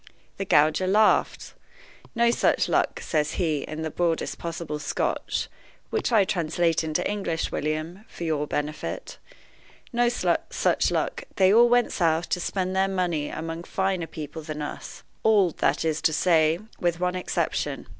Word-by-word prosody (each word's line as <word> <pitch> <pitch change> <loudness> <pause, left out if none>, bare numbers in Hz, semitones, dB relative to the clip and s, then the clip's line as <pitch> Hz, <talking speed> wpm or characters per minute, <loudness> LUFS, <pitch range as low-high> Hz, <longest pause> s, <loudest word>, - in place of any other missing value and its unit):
The 195 - -3
gauger 155 +2 +3
laughs. 210 +3 +2 0.6
'No 235 0 +4
such - - +2
luck,' - - 0
says 150 -2 0
he, 155 -6 0
in 155 +2 -5
the 160 - -3
broadest 170 -1 -1
possible 165 -3 -4
Scotch - - -2 0.4
(which 440 - -1
I 215 -4 +5
translate 165 -2 0
into 155 -1 -1
English, 195 -6 -2
William, 155 +6 -3
for - - -8
your 155 -3 -1
benefit); 150 +1 -4 0.7
'no 240 0 +3
such 245 - +1
luck; - - -2
they 190 0 +5
all 235 +2 +6
went 245 0 +3
south, 165 -1 +1
to - - 0
spend 185 +1 -2
their 190 0 +3
money 175 -6 -1
among 165 +1 -5
finer 190 -2 -1
people 155 0 -7
than 155 -1 -5
us 145 - -7 0.2
all, 205 -5 +4
that - - +1
is 160 -1 0
to 160 - +2
say, 160 -1 +3 0.2
with 175 -1 0
one 180 0 0
exception. 185 0 -2
170 Hz, 155 wpm, -25 LUFS, 155-190 Hz, 0.7 s, all